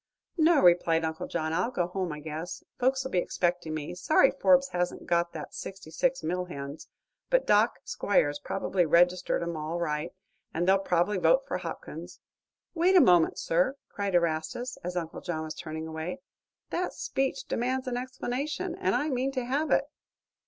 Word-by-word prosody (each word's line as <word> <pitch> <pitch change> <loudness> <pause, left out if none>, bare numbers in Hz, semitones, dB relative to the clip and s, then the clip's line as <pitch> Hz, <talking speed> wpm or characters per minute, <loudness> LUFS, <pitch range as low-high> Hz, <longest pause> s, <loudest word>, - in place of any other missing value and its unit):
"No," 320 0 +5
replied 170 -2 +4
Uncle 160 0 -4
John; 160 -1 -2
"I'll 180 +7 +1
go 180 -9 0
home, 180 -1 -3
I 150 0 -6
guess. 160 +3 -6 0.2
Folks'll 265 +1 +1
be 180 - +2
expecting 175 -3 -1
me. 155 +2 -4
Sorry 265 +9 +4
Forbes 275 0 +4
hasn't 180 0 -2
got 170 0 +1
that 155 - -7
sixty 195 -5 -8
six 265 +9 0
mill 180 +3 -1
hands; 140 -3 -7 0.4
but - - +3
Doc. 210 +3 +4
Squiers 145 -7 +1
probably 195 -1 0
registered 175 +2 +3
'em 170 0 -3
all 155 +2 -3
right, 150 -1 -2 0.4
and 175 +2 0
they'll 195 +1 +5
probably 185 +1 +1
vote - - +4
for - - -2
Hopkins." - - -7 0.5
"Wait 360 +2 +3
a - - +9
moment, 175 - +5
sir!" 180 +12 +1
cried 200 -2 -2
Erastus, 170 +9 0
as 180 +1 -3
Uncle 165 -2 -4
John 160 -3 -3
was 155 0 -5
turning 160 -1 -6
away. 160 +9 -5 0.5
"That 360 +1 -1
speech 270 0 -2
demands 255 +2 -1
an 250 - -1
explanation, 260 +7 -3
and 380 +2 0
I 295 - +1
mean 260 0 0
to 255 -2 -2
have 285 +5 0
it." 275 - +4
180 Hz, 175 wpm, -28 LUFS, 165-260 Hz, 0.5 s, a